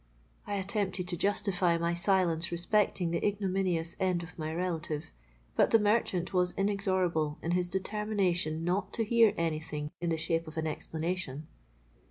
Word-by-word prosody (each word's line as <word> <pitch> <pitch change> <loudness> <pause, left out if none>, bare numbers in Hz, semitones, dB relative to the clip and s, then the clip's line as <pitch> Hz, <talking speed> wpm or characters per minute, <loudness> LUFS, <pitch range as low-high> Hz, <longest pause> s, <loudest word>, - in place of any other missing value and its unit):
'—I 205 - -2
attempted 190 -2 -1
to 175 - +1
justify 185 -2 +1
my 170 +1 0
silence 175 -2 +2
respecting 175 0 +1
the 170 - -1
ignominious 190 -5 0
end 180 -2 +1
of 170 - -11
my 155 -1 -4
relative; 160 -3 -3 0.4
but - - +4
the 225 - +6
merchant 205 -4 +1
was 180 -1 +2
inexorable 185 -6 +1
in 170 - -1
his 175 0 +1
determination 190 -5 0
not 185 +3 0
to 230 - 0
hear 225 -1 +5
any 165 -2 0
thing 150 -1 -5
in 170 - 0
the 165 - +1
shape 165 +1 -1
of 155 +1 -9
an 160 - -1
explanation. 160 -1 -3
180 Hz, 160 wpm, -31 LUFS, 165-195 Hz, 0.4 s, the